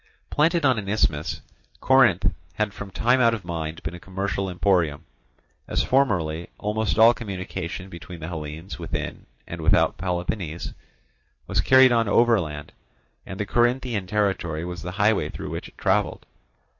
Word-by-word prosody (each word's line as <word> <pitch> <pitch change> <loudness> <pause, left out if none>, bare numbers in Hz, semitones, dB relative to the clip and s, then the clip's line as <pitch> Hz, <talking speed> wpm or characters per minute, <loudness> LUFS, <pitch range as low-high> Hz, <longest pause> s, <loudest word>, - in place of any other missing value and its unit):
Planted 165 +1 +2
on 130 -5 +3
an 100 -2 -6
isthmus, 80 -7 0 0.4
Corinth 130 -9 +4 0.2
had 105 -2 -1
from 100 - -7
time 125 +6 +2
out 115 -1 +4
of 105 - -9
mind 80 -2 -4
been 80 - -4
a 90 - -8
commercial 95 +1 -3
emporium; 85 -4 +1 0.6
as - - 0
formerly 85 -12 +1
almost 105 -3 -1
all 115 +1 +8
communication 95 -4 -5
between 85 -1 -10
the 80 - -6
Hellenes 80 +2 -6
within - - -5 0.2
and - - -7
without - - +3
Peloponnese 90 -2 -3 0.7
was - - +1
carried 130 -1 +6
on 115 -2 +2
overland, 100 -10 +2 0.6
and 95 - -7
the 105 - -1
Corinthian 120 -2 +1
territory 95 -6 -1
was 90 0 -6
the 90 +2 -6
highway 105 +1 +2
through - - -7
which - - -5
it - - -19
travelled. - - 0
95 Hz, 150 wpm, -24 LUFS, 85-115 Hz, 0.7 s, all